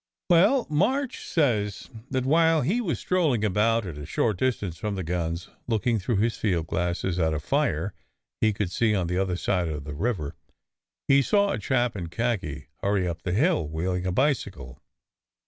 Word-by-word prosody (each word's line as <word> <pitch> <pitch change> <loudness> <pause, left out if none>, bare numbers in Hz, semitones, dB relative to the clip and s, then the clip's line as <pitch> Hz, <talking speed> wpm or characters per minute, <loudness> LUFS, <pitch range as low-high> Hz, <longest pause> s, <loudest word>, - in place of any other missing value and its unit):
"Well, 205 +10 +5
March 245 - 0
says 110 - 0 0.2
that 130 -1 -1
while 160 +2 +4
he 200 - +1
was 165 - -1
strolling 155 - +1
about, 110 +2 +2
at 80 -5 -6
a 75 - -6
short 105 +3 0
distance 100 -10 -1
from 105 +2 -2
the 95 - -3
guns, 85 0 -3 0.2
looking 115 0 +1
through 110 +5 -1
his 110 +4 +1
field 90 -7 0
glasses 90 +1 -1
at 80 -2 +2
a - - -1
fire 100 - 0 0.5
he 110 - +3
could 100 -3 -2
see 110 +2 +2
on 95 -3 0
the 90 +2 -1
other 95 -2 0
side 90 -2 0
of 75 -2 -4
the 75 0 -6
river, 85 -3 -2 0.7
he 140 0 +6
saw 200 +7 +2
a - - -2
chap 125 -4 0
in 90 -4 -4
khaki 95 - -2 0.2
hurry 100 -2 +1
up 85 -1 -4
the 90 - -3
hill, 140 - +2
wheeling 90 +4 -2
a - - 0
bicycle. 95 - -1
105 Hz, 180 wpm, -26 LUFS, 90-130 Hz, 0.7 s, he